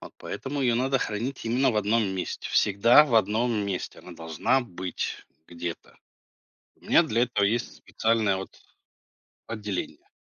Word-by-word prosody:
Вот - - -12
поэтому 140 +1 -5
ее 120 -2 +2
надо 135 +3 +1
хранить 120 +4 -3
именно 125 +3 +2
в 110 - -2
одном 105 +1 +2
месте, 95 -1 -4
всегда 115 +8 +5
в 135 -6 -2
одном 115 +2 +2
месте 100 -4 -3
она 90 - -11
должна 80 +10 0
быть 90 -4 -5 0.2
где-то. 85 -1 -7 0.8
У - - -25
меня - - +6
для 115 +2 0
этого 120 -5 +1
есть 115 +5 -1
специальное 110 -3 0
вот 95 - -8 0.9
отделение. 105 -4 -5
110 Hz, 145 wpm, -26 LUFS, 95-120 Hz, 0.9 s, меня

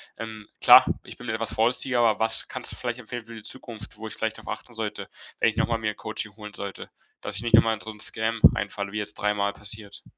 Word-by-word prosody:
Ähm, 110 -2 -8
klar, - - +9 0.2
ich - - -11
bin 120 - -10
etwas 110 0 -2
vorsichtiger, 125 +2 +2
aber 115 -2 +3
was 110 0 +5
kannst - - -1
du - - -4
vielleicht 120 0 -4
empfehlen 120 0 -7
für 115 - -11
die 110 - -10
Zukunft, 115 -3 -5
wo 110 +1 -7
ich - - -5
vielleicht 110 -1 -2
drauf - - -14
achten 120 - -6
sollte, 110 -2 -5 0.3
wenn - - +4
ich 110 - -7
noch - - +2
mal 115 -1 -1
mir 110 -1 -1
'n 105 - -15
Coaching 110 -1 -1
holen 105 -1 -10
sollte? 100 -1 -6 0.3
Dass 100 - -1
ich 100 - +6
nicht 115 -1 +5
noch 115 - +7
mal 115 - +1
in 110 - -6
so 110 - -6
'n 105 - -15
scam 110 +2 0 0.2
reinfalle, 100 -1 -4
wie 105 - -2
jetzt 105 - -4
dreimal 100 -1 0
passiert. 105 0 -4
110 Hz, 260 wpm, -25 LUFS, 105-115 Hz, 0.3 s, klar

